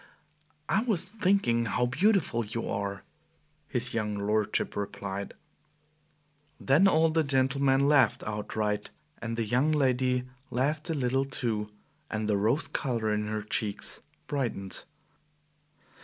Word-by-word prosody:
"I 205 - +2
was 200 -7 +1
thinking 190 - +2
how 125 +3 +1
beautiful 155 - +2
you 115 +2 -4
are," 100 0 -3 0.6
his 125 -2 -2
young 105 -2 -1
lordship 105 +1 0
replied. 100 -1 -4 1.2
Then 150 +9 +4
all 165 -3 +4
the 160 0 +2
gentlemen 135 0 +2
laughed 145 -2 +4
outright, 105 0 -2 0.3
and 115 0 -3
the 115 - 0
young 125 +8 +2
lady 130 -3 +2 0.3
laughed 150 +6 -1
a 165 - 0
little 135 0 +1
too, 115 -6 -2 0.4
and 110 0 -2
the 105 - +2
rose 115 +10 +1
color 115 -6 -1
in 105 0 -1
her 110 0 -2
cheeks 105 -1 -2 0.2
brightened. 115 -9 -3
125 Hz, 125 wpm, -29 LUFS, 105-140 Hz, 1.2 s, Then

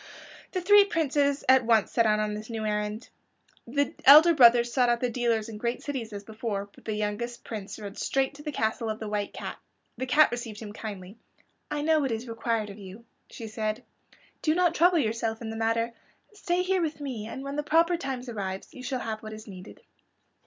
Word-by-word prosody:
The 370 - -1
three 410 +3 +7
princes 290 -6 0
at 260 0 +6
once 225 -2 +3
set 230 -2 +3
out 215 0 +3
on 210 0 -1
this 215 +2 -7
new 220 -2 -4
errand. 210 +2 -2 0.6
The 285 +3 0
elder 310 +5 +9
brothers 240 -3 +6
sought 250 -2 +3
out 240 0 +2
the 250 -1 -1
dealers 230 -2 0
in 215 -2 -8
great 235 +2 -2
cities 255 -6 -4
as 205 -1 -7
before, 210 -2 -4
but - - -19
the 215 - -2
youngest 215 +3 -3
Prince 210 -3 -7
rode 205 -2 -8
straight 270 +1 0
to 285 - -12
the 300 0 -4
castle 225 -2 -1
of 215 - -3
the 220 - -5
White 205 -1 -2
Cat. - - -7 0.4
The 260 - -2
cat 300 +2 +5
received 235 -3 -5
him 210 -2 -8
kindly. 205 -2 -8 0.5
"I 295 -1 -2
know 315 0 +3
what 270 -4 -1
is 225 +2 -3
required 225 -2 -2
of 200 - -12
you," 200 +4 -11 0.2
she 230 - -8
said. 215 0 -3 0.6
"Do 310 0 +2
not 355 -1 +3
trouble 350 +2 +4
yourself 225 -4 -1
in 225 -2 -5
the - - -6
matter. 230 +1 0 0.4
Stay 360 -3 -1
here 375 0 +1
with 310 -3 -2
me, 250 -7 -5
and 265 +4 -7
when 275 0 -5
the 295 - 0
proper 330 +4 +3
time 270 -5 -4
arrives 195 -5 -5
you 255 - -10
shall 255 0 -3
have 220 -1 -4
what 215 0 -8
is 215 +1 -10
needed." 190 -2 -11
235 Hz, 215 wpm, -27 LUFS, 215-280 Hz, 0.6 s, elder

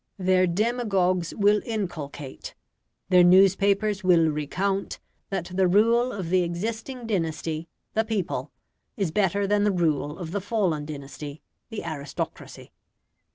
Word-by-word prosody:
Their 185 -1 +3
demagogues 190 -3 +1
will 205 0 +3
inculcate, 155 - -5 0.5
their 180 -1 +6
newspapers 195 +3 +4
will 170 -3 +5
recount, 185 +7 -2 0.3
that 185 -2 -3
the 190 0 +3
rule 230 +6 +3
of 185 -4 -5
the 185 0 +4
existing 225 +8 -4
dynasty 165 -5 -2 0.3
(the 220 - +2
people) 215 -5 -3 0.5
is 195 -6 0
better 200 +2 +1
than 205 +1 +2
the 210 - +3
rule 155 -4 0
of 170 -3 -6
the 200 +1 -2
fallen 185 -8 0
dynasty 145 0 -8 0.3
(the 225 -3 -5
aristocracy). 145 -3 -6
185 Hz, 125 wpm, -25 LUFS, 165-205 Hz, 0.5 s, their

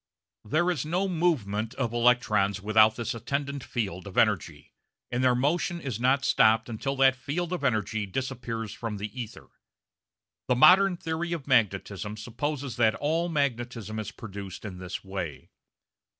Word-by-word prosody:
There 155 +11 +1
is 150 -8 -2
no 180 +6 0
movement 130 - 0
of 120 -4 -2
electrons 110 -5 +2
without 110 +2 +4
this 120 -1 -3
attendant 140 +4 -3
field 100 -6 -4
of 95 - -9
energy, - - +1 0.4
and 125 +1 0
their 125 -1 +4
motion 170 +6 0
is 130 -8 -4
not 130 +3 +2
stopped 110 0 +4
until 135 +5 -3
that 135 -1 +5
field 155 +7 -3
of 175 -5 -3
energy 110 -4 0
disappears 115 -1 -4
from 115 -3 -5
the 105 +5 -5
ether. 110 -2 -10 1.0
The 125 - +3
modern 180 +7 +6
theory 165 +1 -3
of 160 -5 -5
magnetism 105 -4 0
supposes 130 +3 -4
that 110 -2 +3
all 165 +4 0
magnetism 120 - -2
is 110 - -4
produced 100 -2 -8
in 95 -3 -7
this 90 0 -6
way. 95 -6 -6
120 Hz, 150 wpm, -27 LUFS, 110-140 Hz, 1.0 s, modern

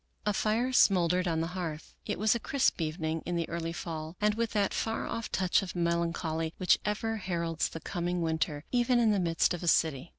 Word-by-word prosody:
A 210 - +2
fire 225 +6 0
smoldered 180 -4 +4
on 160 -1 0
the 165 - -2
hearth. 165 -4 -5
It - - -1
was 215 +2 +3
a 235 - -1
crisp 265 -7 +1
evening' 160 0 -2
in 175 - -3
the 170 -1 -1
early 165 0 -3
fall, 160 -1 -6
and 210 0 +2
with 230 +1 -1
that 205 -2 +1
far 225 0 -2
off 230 - -4
touch 185 0 +2
of 190 -2 -6
melancholy 170 -1 -1
which 185 -2 +3
ever 220 +2 -1
heralds 170 -4 -1
the 165 - -8
coming 175 0 -2
winter, 160 -2 -1
even 245 0 +3
in 230 -2 +4
the 205 - +2
midst 165 -1 +2
of 175 - -5
a 175 - -4
city. 160 -2 +2
175 Hz, 210 wpm, -30 LUFS, 165-210 Hz, -, smoldered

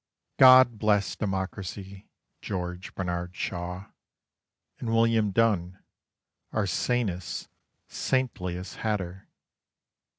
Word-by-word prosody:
_ - - -51
God 130 -3 +8
bless 105 -3 +2
Democracy, 95 -1 -5 0.3
George 90 -1 -5
Bernard 90 -1 -3
Shaw, 90 +2 -5 0.9
And 120 - -4
William 115 -2 +3
Dunn, 95 -4 +1 0.7
our 110 -2 0
sanest, 95 -2 -2 0.4
saintliest 90 -9 -2
hatter! 95 -4 -3
95 Hz, 80 wpm, -27 LUFS, 90-110 Hz, 0.9 s, God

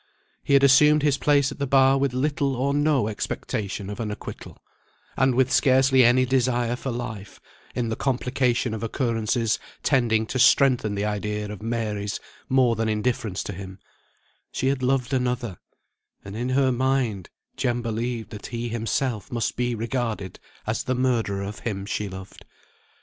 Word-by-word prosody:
He - - 0
had 140 0 +6
assumed 150 +2 +6
his 140 -2 +2
place 145 -2 +3
at - - -9
the 140 - -1
bar 135 0 +5
with 140 -1 +1
little 140 +1 0
or 135 +3 0
no 145 -5 +2
expectation 100 -1 -4
of 105 +2 -6
an 110 -2 -2
acquittal; 105 - -8 0.6
and 130 -1 +2
with 130 0 +2
scarcely 130 0 +4
any 125 +2 +5
desire 125 -2 +1
for 130 - -5
life, 110 -5 -6 0.4
in 120 -2 -1
the 110 - -1
complication 125 -2 0
of 110 - -4
occurrences 115 -1 0 0.2
tending 115 -5 +2
to 130 - -3
strengthen 125 -5 +4
the 100 +1 -1
idea 105 0 -3
of 105 - -8
Mary's 105 -3 -2 0.3
more 130 -3 +3
than 110 0 -1
indifference 110 -2 -1
to 105 - -5
him; 95 0 -8 0.7
she 130 - 0
had 135 -1 -1
loved 130 0 0
another, 125 -6 -1 0.7
and 100 +1 -7
in 120 +3 -2
her 130 0 +3
mind 125 -7 0 0.3
Jem 120 -2 -1
believed 115 0 -3
that 105 -2 -8
he 120 0 -4
himself 115 -1 -2
must 120 -2 -1
be 120 0 -1
regarded 115 -4 -3 0.3
as 110 +1 -1
the 130 -1 -1
murderer 115 -6 0
of 100 +2 -6
him 100 -4 -4
she 105 0 -3
loved. 95 0 -10
120 Hz, 165 wpm, -24 LUFS, 110-130 Hz, 0.7 s, had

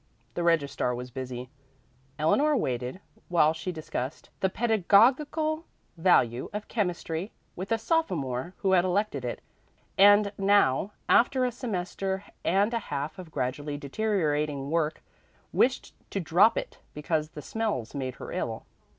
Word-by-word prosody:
The 175 - -2
registrar 145 -7 +1
was 125 +1 -7
busy. 125 0 -6 0.7
Eleanor 280 - +3
waited 125 - -2 0.3
while 160 -3 +4
she 165 +3 -4
discussed 155 -4 -5
the 190 - +2
pedagogical 250 - +3 0.3
value 145 -9 +3
of 210 0 -5
chemistry 180 -3 -2 0.2
with 190 +5 -6
a 225 - +3
sophomore 175 - -1
who 190 - +3
had 180 -2 +5
elected 185 -6 0
it, 120 - -4 0.6
and 205 +1 +7
now, 195 -3 +3 0.2
after 255 +2 +4
a 250 - 0
semester 195 -4 -3 0.2
and 200 +5 +2
a 230 - +1
half 145 +4 -3
of 180 -3 -9
gradually 145 +2 -3
deteriorating 150 -4 -1
work, 160 -2 0 0.5
wished 255 +1 +1 0.2
to 200 - -2
drop 195 +6 +4
it - - -5 0.2
because 155 +1 -1
the 150 -2 -9
smells 215 - -2
made 130 -3 -4
her - - -8
ill. - - -3
175 Hz, 135 wpm, -28 LUFS, 145-210 Hz, 0.7 s, and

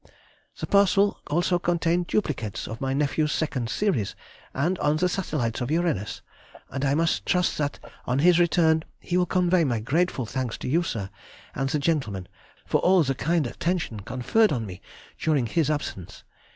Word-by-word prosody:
The - - -2
parcel 200 0 +3
also 175 +3 +1
contained 170 0 +1
duplicates 130 - -2
of 115 +1 -7
my 135 0 -1
nephew's 150 +2 +1
second 130 -8 -1
series, 120 - 0 0.4
and 170 +7 0
on 150 +1 +2
the 180 +3 +2
satellites 150 - -2
of 125 - -2
Uranus, 160 - -1 0.5
and 135 0 -3
I 140 0 +2
must 165 +1 +1
trust 180 -3 +1
that 145 -1 -1 0.3
on 125 - +1
his 175 +4 +5
return 160 -2 +3 0.2
he 175 - -3
will 180 0 +3
convey 180 0 +3
my 120 -6 0
grateful 135 +3 0
thanks 125 -1 -3
to - - -6
you, 160 +7 +2
sir, 110 - -4 0.4
and 135 +1 -1
the 150 - +1
gentlemen, 135 - -1 0.4
for - - +1
all 185 -2 +5
the 135 -2 0
kind 165 +3 0
attention 165 - -2
conferred 130 - +1
on 120 -6 -1
me 90 -3 -9 0.4
during 150 -6 +1
his 155 +6 +1
absence. 145 - -4
155 Hz, 170 wpm, -25 LUFS, 125-175 Hz, 0.5 s, his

